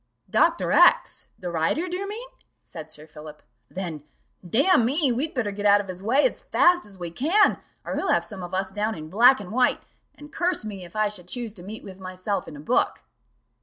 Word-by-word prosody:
"Dr. -, -, +2 dB
X -, -, +4 dB
the 180 Hz, -1 st, -5 dB
writer, 170 Hz, -, 0 dB
do 360 Hz, -, -4 dB
you 395 Hz, +2 st, -4 dB
mean?" 460 Hz, +4 st, -7 dB, 0.4 s
said 160 Hz, -2 st, -10 dB
Sir 150 Hz, 0 st, -10 dB
Philip; 150 Hz, -1 st, -12 dB, 0.3 s
"then, 175 Hz, -5 st, -5 dB, 0.4 s
damn 240 Hz, -, +3 dB
me, 275 Hz, +3 st, +2 dB
we'd 280 Hz, +7 st, -2 dB
better 225 Hz, -5 st, -1 dB
get 205 Hz, +1 st, -1 dB
out 205 Hz, 0 st, +6 dB
of 200 Hz, -2 st, -6 dB
his 185 Hz, 0 st, -6 dB
way 250 Hz, -, +3 dB
as -, -, -8 dB
fast 350 Hz, -7 st, +3 dB
as 195 Hz, -2 st, -14 dB
we 175 Hz, -2 st, -6 dB
can, 330 Hz, -, +3 dB, 0.3 s
or -, -, -3 dB
he'll -, -, -2 dB
have -, -, +2 dB
some 200 Hz, -4 st, -8 dB
of 175 Hz, 0 st, -7 dB
us 190 Hz, 0 st, -2 dB
down 210 Hz, +2 st, -2 dB
in 155 Hz, 0 st, -8 dB
black 245 Hz, +5 st, +6 dB
and 200 Hz, -2 st, -9 dB
white; 250 Hz, +2 st, +2 dB, 0.3 s
and 295 Hz, 0 st, -14 dB
curse 350 Hz, -8 st, 0 dB
me, 200 Hz, -3 st, -7 dB
if 175 Hz, -, -13 dB
I 215 Hz, 0 st, +2 dB
should 195 Hz, -4 st, -8 dB
choose 235 Hz, +1 st, -5 dB
to 180 Hz, -5 st, -9 dB
meet 215 Hz, +4 st, -8 dB
with 190 Hz, -1 st, -11 dB
myself 185 Hz, +1 st, -4 dB
in 150 Hz, -, -9 dB
a -, -, -10 dB
book." 230 Hz, +12 st, 0 dB
205 Hz, 220 wpm, -25 LUFS, 180-255 Hz, 0.4 s, out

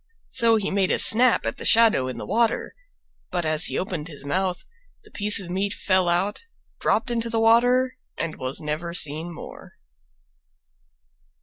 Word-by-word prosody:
So 230 Hz, -2 st, +4 dB
he 210 Hz, -2 st, -2 dB
made 195 Hz, -1 st, 0 dB
a -, -, +1 dB
snap 245 Hz, +2 st, +4 dB
at -, -, -3 dB
the -, -, -6 dB
shadow 225 Hz, -, +4 dB
in 130 Hz, -, -6 dB
the -, -, -7 dB
water, 230 Hz, -1 st, -1 dB, 0.6 s
but 175 Hz, -2 st, -2 dB
as 155 Hz, +1 st, +2 dB
he -, -, +1 dB
opened 180 Hz, -5 st, -4 dB
his 145 Hz, -3 st, -8 dB
mouth 180 Hz, +4 st, -2 dB, 0.4 s
the 425 Hz, -, -20 dB
piece 205 Hz, -1 st, +3 dB
of 180 Hz, -3 st, -9 dB
meat 195 Hz, +2 st, -2 dB
fell 185 Hz, -2 st, 0 dB
out, 190 Hz, -, -1 dB, 0.4 s
dropped 235 Hz, +3 st, -1 dB
into 230 Hz, -1 st, -2 dB
the 225 Hz, 0 st, -1 dB
water 245 Hz, +3 st, +2 dB, 0.2 s
and 165 Hz, -2 st, -4 dB
was 130 Hz, +1 st, -5 dB
never 155 Hz, +3 st, -5 dB
seen 155 Hz, +2 st, 0 dB
more. 170 Hz, -, -12 dB
190 Hz, 170 wpm, -23 LUFS, 165-230 Hz, 0.6 s, So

